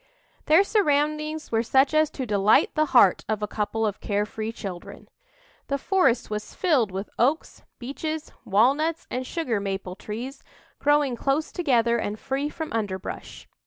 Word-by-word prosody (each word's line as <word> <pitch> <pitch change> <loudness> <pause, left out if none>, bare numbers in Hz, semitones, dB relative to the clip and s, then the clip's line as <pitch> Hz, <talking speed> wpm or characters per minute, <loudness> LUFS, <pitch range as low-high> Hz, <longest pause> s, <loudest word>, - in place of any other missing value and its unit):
Their 320 +6 +6
surroundings 305 -5 0
were 225 -1 +2
such 265 +5 +3
as 310 0 +4
to 265 - -5
delight 205 -1 +3
the 310 0 +2
heart 240 -9 +5
of 215 -1 -1
a - - 0
couple 220 +2 -2
of 210 -2 -2
care 205 0 0
free 220 +1 -5
children. 190 -6 -8 0.6
The 280 - 0
forest 275 -7 +2
was 210 0 -5
filled 295 - +2
with 190 +2 -6
oaks, 280 +7 0 0.2
beeches, 305 +5 -5
walnuts 280 +11 +2
and 255 0 -3
sugar 255 -11 -1
maple 195 -2 -4
trees, 235 +8 -7 0.4
growing 290 -3 +2
close 275 +6 -1
together 235 -8 +2
and 210 -1 -3
free 275 +2 -2
from 315 0 -6
underbrush. 200 -4 -5
255 Hz, 155 wpm, -25 LUFS, 210-305 Hz, 0.6 s, Their